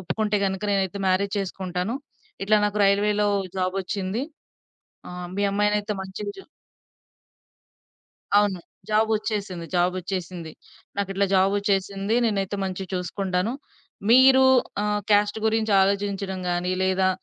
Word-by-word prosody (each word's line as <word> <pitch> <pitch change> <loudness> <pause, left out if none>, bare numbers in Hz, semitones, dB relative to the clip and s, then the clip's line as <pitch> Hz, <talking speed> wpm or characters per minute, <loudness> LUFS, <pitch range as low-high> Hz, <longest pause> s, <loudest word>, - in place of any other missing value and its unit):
ఒప్పుకుంటే 210 +3 -1
గనక 190 +1 -3
నేనైతే 195 0 -1
మ్యారేజ్ 195 +2 +1
చేసుకుంటాను. 190 +2 -3 0.5
ఇట్లా 215 +1 +4
నాకు 210 0 -2
రైల్వే‌లో 205 +1 +2 0.3
జాబ్ 185 +1 -1
ఒచ్చింది. 195 +6 -3 0.9
ఆహ్, 180 0 -6
మీ 205 - 0
అమ్మాయినయితే 210 +1 +1
మంచిగా 190 +2 -6
జూ" 385 - -9 1.9
అవును. 205 -3 +2 0.3
జాబ్ 220 +1 +3
ఒచ్చేసింది. 200 -5 -4
జాబ్ 180 +1 +2
ఒచ్చేసింది. 180 -2 -5 0.5
"నాకిట్లా 200 0 0
జాబ్ 190 +1 +4
ఒచ్చేసింది 200 +1 -1
నేనైతే 200 -2 0
మంచిగా 190 0 -4
చూసుకుంటాను. 185 +3 -1 0.6
మీరు 260 +2 +7 0.4
ఆహ్, 210 0 0
క్యాస్ట్ 205 +1 +3
గురించి 220 -1 +1
ఆలోచించడం 195 -1 -1
గాని, 175 +1 0
లేదా 190 0 +2
195 Hz, 115 wpm, -24 LUFS, 185-210 Hz, 1.9 s, మీరు